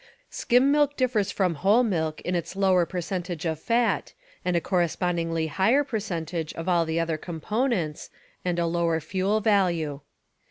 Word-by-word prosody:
Skim 250 +3 +3
milk 290 -1 +2
differs 245 -6 +1
from 185 -3 +1
whole 210 +6 +5
milk 160 -8 -1
in 180 - -3
its 175 +1 -3
lower 185 -3 +3
percentage 175 -1 -4
of 160 -2 -1
fat, 235 +5 0 0.3
and 180 -1 0
a - - +4
correspondingly 170 -2 0
higher 195 - +2
percentage 170 - -4
of 165 +2 -6
all 175 -2 +3
the 160 +1 -1
other 165 -1 -1
components, 175 - -2 0.3
and 180 -1 -1
a 170 - +1
lower 165 -1 +1
fuel 190 +6 0
value. 175 -9 +1
180 Hz, 155 wpm, -26 LUFS, 165-210 Hz, 0.3 s, whole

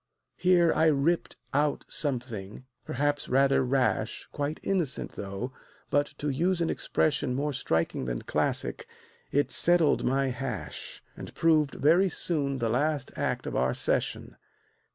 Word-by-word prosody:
Here 175 -2 +4
I 160 - +3
ripped 155 +3 +1 0.2
out 145 +1 +1
something, 120 -6 -3 0.2
perhaps 145 +2 -1
rather 135 +1 +4
rash, 130 0 0
Quite 145 +2 -3
innocent, 175 -9 -1
though; 100 +6 -5 0.4
but 145 +1 +3
to 150 - -2
use 175 +6 +1
an 170 - +1
expression 130 -4 0
More 145 +2 -1
striking 80 - -1
than - - -3
classic, - - -1 0.4
it 145 +1 +1
"settled 170 -3 +3
my 135 +1 +1
hash," 125 -4 -5
And - - -8
proved 155 -3 +3
very 175 +6 +4
soon 145 -5 0
the 120 -3 -1
last 145 +3 0
act - - -2
of - - -4
our 65 0 +1
session. - - -1
140 Hz, 135 wpm, -28 LUFS, 130-155 Hz, 0.4 s, Here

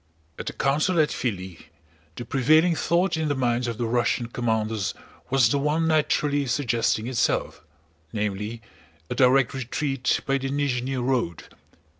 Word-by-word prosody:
At - - -6
the - - -3
council 155 +6 +1
at 155 - +4
Filí 95 -7 -4 0.5
the 120 - -6
prevailing 155 +8 +3
thought 170 +3 +1
in 160 -1 -1
the 145 - 0
minds 125 -1 0
of 115 -2 -3
the 120 - -1
Russian 120 +1 +1
commanders 110 -4 -1 0.3
was 130 -4 +4
the 140 - +1
one 150 +3 +1
naturally 150 -2 +1
suggesting 120 -3 0
itself, 125 -2 -1 0.5
namely, 105 +2 -3 0.5
a - - +2
direct 130 0 +4
retreat 135 +1 -1
by 135 0 +1
the 135 0 -3
Nízhni 135 -2 -1
road. 120 -9 -1
130 Hz, 145 wpm, -25 LUFS, 115-145 Hz, 0.5 s, at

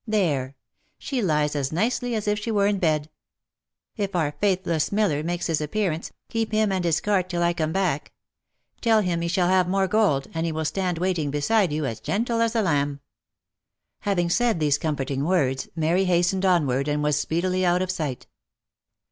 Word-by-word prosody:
There! 150 -11 0 0.4
she 265 -4 -3
lies 150 -5 +1
as 140 -1 -1
nicely 235 +7 0
as 215 -1 -3
if 210 0 +1
she 220 - -5
were 205 -3 +2
in 200 -1 +1
bed. 155 -3 0 0.8
If 200 -2 -3
our 155 -4 +1
faithless 180 -4 0
miller 200 -8 +1
makes 175 +2 -2
his 160 -3 0
appearance, 165 +1 -2 0.2
keep 225 -1 -2
him 215 -1 +2
and 185 -2 0
his 165 -2 +2
cart 190 -3 +1
till 175 -1 -1
I 170 0 +2
come 160 -2 -1
back; 180 -5 -1 0.7
tell 225 -2 +4
him 175 -3 -1
he 170 - -1
shall 175 +1 +1
have 185 -1 +3
more 195 0 +2
gold, 185 -10 +2
and 165 0 -2
he 165 - -1
will 160 0 -3
stand 180 +1 -1
waiting 175 -4 0
beside 170 +6 +1
you, 150 0 -1
as 115 -4 -4
gentle 230 - -1
as 230 0 +1
a 225 - +2
lamb." 145 -5 0 1.0
Having 180 -5 0
said 235 -3 +2
these 145 -2 +2
comforting 140 -4 -2
words, 140 -6 0
Mary 170 +4 +1
hastened 180 +2 +2
onward 140 -7 +2
and 150 0 0
was 150 -1 +2
speedily 185 +3 0
out 180 +1 +2
of 185 - -2
sight. 150 -8 -4
175 Hz, 190 wpm, -24 LUFS, 150-195 Hz, 1.0 s, tell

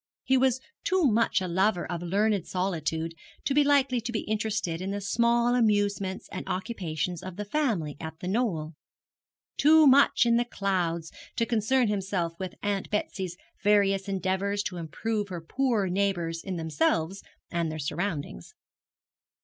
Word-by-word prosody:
He 265 - +2
was 260 -1 +3 0.2
too 370 -1 +2
much 230 -5 +3
a 185 - -2
lover 185 +1 +1
of 170 0 -4
learned 200 +2 +1
solitude 165 -3 -2 0.3
to 275 - +1
be 295 +1 +5
likely 275 -4 +3
to 235 - -4
be 225 - -1
interested 210 -6 -2
in 190 - -3
the 200 +1 -2
small 235 +4 +2
amusements 205 -5 +1
and - - -5
occupations 180 -4 -3
of 185 -1 -7
the 210 +2 -5
family 205 - -1
at 160 0 -7
The 180 - -5
Knoll 185 -7 -1 0.8
too 310 +2 +6
much 275 -2 +6
in 235 0 +4
the 240 - +2
clouds 175 -7 -1 0.2
to 230 - +1
concern 235 +2 +2
himself 190 -4 -1
with 185 -2 -5
Aunt 200 -1 -1
Betsy's 190 -4 -3 0.3
various 200 -1 +3
endeavours 195 +2 -1
to 185 -2 -4
improve 205 +6 -2
her 180 -3 -5
poorer 225 +3 0
neighbours 175 -3 -1
in 190 -2 -4
themselves 160 +3 0 0.3
and 170 -2 -1
their 155 - -5
surroundings. 150 - -4
195 Hz, 155 wpm, -28 LUFS, 175-225 Hz, 0.8 s, too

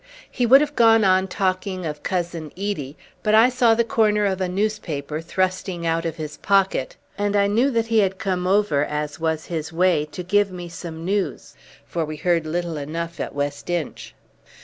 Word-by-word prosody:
He 245 - 0
would 270 +4 +8
have 295 -1 -2
gone 225 -1 +5
on 190 0 +3
talking 185 -1 -2
of 150 -2 -5
Cousin 170 -4 -3
Edie, 185 -9 -4 0.2
but 215 0 +3
I 225 +3 +7
saw 240 -3 +3
the 235 - +3
corner 215 -2 +2
of 190 -1 -1
a 185 - 0
newspaper 180 -7 -2
thrusting 185 0 -2
out 165 0 0
of 165 -1 -2
his 155 -2 -6
pocket, 195 -9 +1 0.2
and 205 0 0
I 200 0 +4
knew 225 +7 +2
that 230 -4 0
he 225 -1 +2
had 195 -2 +1
come 185 -3 -2
over, 190 -7 +2
as 150 +1 -3
was 160 -1 -1
his 160 -2 -4
way, 170 -2 +2
to 155 +4 -7
give 205 +2 +2
me 175 -1 -7
some 165 -1 -8
news, 195 +1 -2 0.3
for 170 - -2
we 155 0 -5
heard 170 -1 +1
little 170 0 -2
enough 165 +4 -5
at - - -4
West 145 +3 -3
Inch. 175 -4 -4
185 Hz, 195 wpm, -22 LUFS, 160-205 Hz, 0.3 s, would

